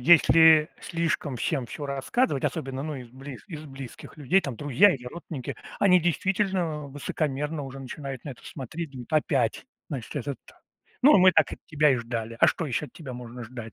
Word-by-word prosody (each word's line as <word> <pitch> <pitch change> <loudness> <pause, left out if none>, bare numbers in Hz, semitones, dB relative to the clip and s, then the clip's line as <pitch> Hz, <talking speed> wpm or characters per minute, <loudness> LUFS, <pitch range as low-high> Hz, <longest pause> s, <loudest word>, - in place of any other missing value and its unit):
если 160 +1 +7
слишком 165 -5 -2
всем 130 +1 -1
всё 145 +4 -7
рассказывать, 140 - 0
особенно, 135 -1 -2
ну, 155 0 -4
из 125 -2 -9
близ 135 0 -10
из 155 -6 -8
близких 135 -2 -10
людей, 155 +6 +3
там, 130 -8 -5
друзья 150 +8 +5
или 125 -2 -9
родственники, 150 -3 -6 0.2
они 180 -3 +5
действительно 175 -3 0
высокомерно 145 +1 -2
уже 135 0 -7
начинают 135 0 -7
на 145 - -5
это 125 - -11
смотреть. 150 +4 -6
Думают: 130 +2 -10
"Опять, 140 - +1 0.2
значит, 135 -1 -5
этот. 140 0 -3 0.6
Ну, 285 +4 +8
мы 185 +1 +8
так - - +3
от - - -6
тебя 150 -2 +3
и 130 - +3
ждали. 115 -1 -4
А - - +8
что 165 - 0
ещё 145 +2 -2
от - - -19
тебя 140 -6 -8
можно 120 0 -8
ждать?" 115 -1 -8
145 Hz, 185 wpm, -27 LUFS, 130-160 Hz, 0.6 s, Ну